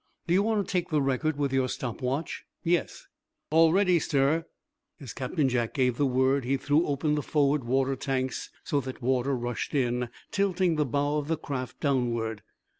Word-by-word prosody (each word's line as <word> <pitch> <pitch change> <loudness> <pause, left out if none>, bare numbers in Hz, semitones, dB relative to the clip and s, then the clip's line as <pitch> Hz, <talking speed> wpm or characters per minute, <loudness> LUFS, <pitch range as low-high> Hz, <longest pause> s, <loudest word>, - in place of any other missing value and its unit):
"Do 170 - +1
you 190 - +5
want 210 -1 0
to - - -5
take 180 -3 0
the 155 - +2
record 140 +3 0
with 140 -2 -1
your 130 -1 +2
stop 120 -2 -4
watch?" 135 +5 -2 0.2
"Yes?" 170 +1 0 0.5
"All 165 0 +6
ready, 180 -1 +4
sir." 150 +2 +1 0.5
As 135 -7 -8
Captain 135 +3 0
Jack 120 -3 -1
gave 125 -3 +2
the 145 - +2
word 130 +1 +2
he 135 +3 +1
threw 145 +5 +2
open 145 +1 0
the 150 - 0
forward 145 -2 +1
water 135 +2 +1
tanks, 130 0 -2
so 145 - 0
that 130 -1 -8
water 130 +2 +1
rushed 120 +3 -3
in, 125 -2 0 0.2
tilting 190 -3 +1
the 150 -2 +1
bow 145 +3 0
of 145 - -5
the 165 0 0
craft 130 -4 -5
downward. 115 -6 0
140 Hz, 190 wpm, -28 LUFS, 130-155 Hz, 0.5 s, All